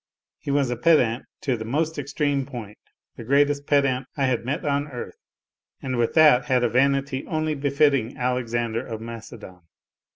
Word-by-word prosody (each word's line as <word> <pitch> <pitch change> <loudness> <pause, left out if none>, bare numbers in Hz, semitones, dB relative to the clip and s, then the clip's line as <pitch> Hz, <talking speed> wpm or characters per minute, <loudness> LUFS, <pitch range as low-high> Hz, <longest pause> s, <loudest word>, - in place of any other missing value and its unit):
He - - -8
was 140 -3 +1
a - - -1
pedant, 125 -4 +3 0.2
to 135 -4 0
the 110 - -6
most 155 +7 -1
extreme 140 -1 -1
point, 115 -6 -9 0.4
the - - -7
greatest 145 +3 +2
pedant 140 -3 +2
I 140 - +2
had 125 -3 0
met 150 +6 -3
on 145 0 0
earth, 125 -5 -8 0.6
and 130 -1 -3
with 120 -1 0
that 150 -6 +6
had 125 -1 +2
a 120 - +2
vanity 135 +1 +1
only 155 -1 -1
befitting 140 -4 +1
Alexander 120 -2 -1
of 115 -4 -6
Macedon. 115 -5 -10
130 Hz, 165 wpm, -24 LUFS, 120-145 Hz, 0.6 s, that